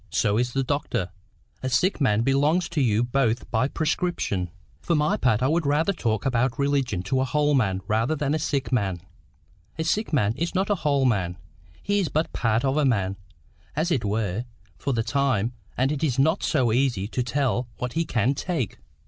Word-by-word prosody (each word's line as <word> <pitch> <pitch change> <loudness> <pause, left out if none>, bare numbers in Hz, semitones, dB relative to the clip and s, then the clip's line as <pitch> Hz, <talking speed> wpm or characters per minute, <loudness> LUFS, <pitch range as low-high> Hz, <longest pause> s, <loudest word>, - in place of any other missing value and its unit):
So 105 +1 +1
is 125 0 -1
the 135 - +1
doctor. 125 -9 -2 0.5
A 130 - -2
sick 180 +7 +1
man 110 -5 +3
belongs 145 +7 +2
to 165 -4 0
you 115 -3 +2
both 120 -1 0
by 125 +3 +2
prescription." 155 - -1 0.3
"For 170 - 0
my 150 0 +2
part 125 -2 +1
I - - +4
would 165 +3 +1
rather 150 +6 +2
talk 110 - -1
about 125 -1 +1
religion 135 -9 0
to 130 +7 0
a - - +2
whole 150 +2 +1
man 95 -8 +1
than 140 +7 0
a 155 - 0
sick 140 -3 -1
man. 95 -8 0 0.8
A 160 - -1
sick 210 +7 0
man 110 -9 +2
is 170 +4 -2
not 195 +2 +1
a - - +4
WHOLE 140 -3 +2
man. 95 -7 0 0.5
He 205 0 +1
is 180 -6 0
but 155 +3 -1
part 115 +1 +1
of 135 +2 +1
a 150 - +3
man, 100 -8 +1 0.6
as 160 +4 0
it 130 -9 +1
were, 105 +1 -1 0.3
for 140 - -3
the 115 -3 0
time, 130 -4 0 0.2
and 130 +3 +2
it 150 0 -2
is 135 -5 +1
not 160 +7 +3
so 130 -7 +2
easy 120 -5 +1
to 125 - -1
tell 125 -1 0
what 125 0 -4
he 165 - +1
can 125 -3 +1
take." 140 - -3
130 Hz, 200 wpm, -25 LUFS, 115-150 Hz, 0.8 s, I